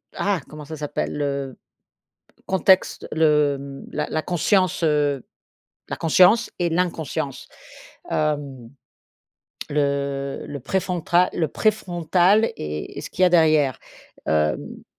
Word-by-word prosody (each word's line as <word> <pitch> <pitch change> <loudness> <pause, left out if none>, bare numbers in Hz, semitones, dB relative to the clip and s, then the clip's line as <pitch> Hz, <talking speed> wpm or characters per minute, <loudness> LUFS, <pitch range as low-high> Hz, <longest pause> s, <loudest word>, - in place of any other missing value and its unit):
ah! 200 -3 0
Comment 150 -1 -9
ça 160 +2 -7
s'appelle? 150 -1 -3
Le 140 -2 -2 0.9
contexte 190 0 +2
le 145 -3 +1
la 150 0 -2
la 155 - -1
conscience, 180 +1 +1
heu, 145 -4 +1 0.7
la - - -2
conscience 185 +8 +4
et 175 -1 +1
l'inconscience. 165 -5 -2 0.6
Hem, 145 -6 -2 1.0
le 140 -1 -1
le 140 -2 -6
préfrontal 180 +2 +1
le 160 -3 0
préfrontal 190 +1 +2
et 75 0 -6
ce - - -7
qu'il 185 - -2
y - - +8
a 180 - +3
derrière. 155 -6 +3 0.5
Hem 75 0 -1
155 Hz, 110 wpm, -23 LUFS, 140-180 Hz, 1.0 s, y